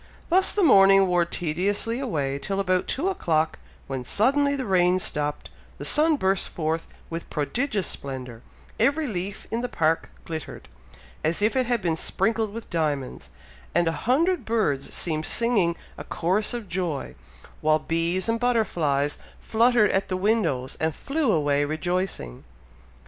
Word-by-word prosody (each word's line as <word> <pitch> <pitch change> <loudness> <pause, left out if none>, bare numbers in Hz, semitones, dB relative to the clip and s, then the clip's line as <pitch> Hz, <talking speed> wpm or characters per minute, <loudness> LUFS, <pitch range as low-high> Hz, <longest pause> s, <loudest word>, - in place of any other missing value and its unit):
Thus 375 +2 +4
the 410 - +1
morning 195 - +7
wore 175 -2 +2
tediously 190 +8 -1
away 145 - -2
till 195 +6 -2
about 185 -2 +1
two 315 +8 -1
o'clock, 160 - 0 0.3
when 135 -2 -4
suddenly 280 - +2
the 265 -2 -3
rain 180 -2 +3
stopped, 150 -5 -2 0.3
the - - -7
sun 310 +1 +3
burst 195 -7 0
forth 160 0 -2 0.2
with 165 +1 -5
prodigious 205 - -1
splendour, 130 -4 -6 0.4
every 305 +3 +2
leaf 195 -4 -4
in 230 +1 -1
the 250 - -3
park 165 -5 0 0.2
glittered, 160 -2 -7 0.6
as 165 +6 +1
if 215 - +2
it 255 -2 +1
had 240 -5 0
been 165 -2 +1
sprinkled 220 +5 0
with 230 +2 -8
diamonds, 150 -6 -2 0.5
and 175 - +3
a - - +3 0.2
hundred 335 +7 +3
birds 180 -12 0
seemed 155 -2 -2
singing 205 -8 +2 0.2
a - - -5
chorus 195 +7 0
of 235 -4 -6
joy, 170 - -3 0.5
while 155 0 +4
bees 165 +4 0
and 230 0 0
butterflies 165 - +1 0.2
fluttered 230 -1 +3
at 195 0 0
the 185 - -2
windows 185 - 0
and 160 -1 0
flew 285 -3 0
away 145 -3 +2
rejoicing. 155 - -2
185 Hz, 150 wpm, -25 LUFS, 155-230 Hz, 0.6 s, morning